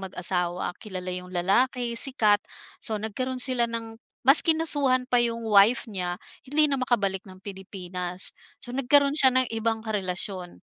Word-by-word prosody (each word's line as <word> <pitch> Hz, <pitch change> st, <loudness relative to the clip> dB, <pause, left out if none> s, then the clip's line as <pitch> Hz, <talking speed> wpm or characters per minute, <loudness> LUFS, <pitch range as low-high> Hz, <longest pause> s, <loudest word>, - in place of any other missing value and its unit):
mag-asawa, 180 Hz, -1 st, -1 dB
kilala 185 Hz, -3 st, -6 dB
'yong 180 Hz, 0 st, -6 dB
lalaki, 240 Hz, +7 st, +1 dB
sikat. 215 Hz, -6 st, +2 dB, 0.4 s
So, 220 Hz, -, -4 dB
nagkaroon 250 Hz, +4 st, -3 dB
sila 245 Hz, -2 st, +1 dB
ng 225 Hz, -1 st, -6 dB, 0.3 s
mas 275 Hz, +3 st, +8 dB
kinasuhan 290 Hz, -6 st, +2 dB
pa 245 Hz, -2 st, +2 dB
'yong 230 Hz, -1 st, -2 dB
wife 210 Hz, +3 st, +4 dB
niya, 180 Hz, -5 st, -4 dB, 0.3 s
hindi 300 Hz, +3 st, +3 dB
na 275 Hz, -2 st, -1 dB
makabalik 200 Hz, -7 st, 0 dB
ng 185 Hz, 0 st, -13 dB
Pilipinas. 185 Hz, -2 st, -5 dB, 0.3 s
So, 245 Hz, -1 st, -8 dB
nagkaroon 280 Hz, +2 st, +3 dB
siya 270 Hz, -4 st, +5 dB
ng 255 Hz, 0 st, +2 dB
ibang 225 Hz, 0 st, -2 dB
karelasyon, 190 Hz, -3 st, -5 dB
225 Hz, 145 wpm, -25 LUFS, 190-255 Hz, 0.4 s, mas